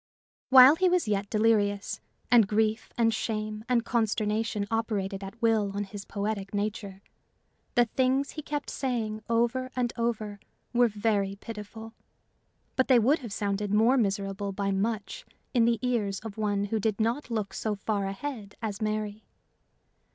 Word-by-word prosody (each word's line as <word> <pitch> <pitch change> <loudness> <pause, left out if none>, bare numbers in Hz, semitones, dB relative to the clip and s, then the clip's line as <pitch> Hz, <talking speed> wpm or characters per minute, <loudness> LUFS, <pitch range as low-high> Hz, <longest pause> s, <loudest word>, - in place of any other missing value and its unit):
While 265 +3 +9
he 370 +1 +3
was 355 -7 +1
yet 200 -1 -1
delirious, 210 -2 +1 0.3
and 230 -4 +6
grief 215 +2 0
and 225 -1 +3
shame 215 -1 -3
and 240 -2 +2
consternation 215 -2 0
operated 205 -4 -1
at 195 +4 -9
will 220 -3 +3
on 205 - -1
his 200 0 -8
poetic 200 -1 -3
nature, 200 -1 -3 0.7
the 240 - +5
things 260 +4 +1
he 305 - -6
kept 295 -1 -4
saying 225 -5 -2
over 240 +3 +1
and 245 -2 0
over 220 -3 -2 0.3
were 240 0 +5
very 205 -2 0
pitiful; 220 +1 -9 0.8
but 260 - +2
they 255 -2 +6
would 260 +8 +3
have 240 -6 -8
sounded 200 0 -2
more 225 +5 +4
miserable 200 -3 -1
by 195 0 -1
much 220 - -2 0.3
in 235 -3 +4
the 235 0 +3
ears 210 -6 0
of 220 -2 -7
one 205 -2 0
who 220 +2 -1
did 215 0 -1
not 235 +6 0
look 215 -4 -2
so 215 -2 -2
far 200 -1 -2
ahead 205 0 -6
as 215 -3 -4
Mary. 215 0 -2
215 Hz, 155 wpm, -28 LUFS, 205-235 Hz, 0.8 s, While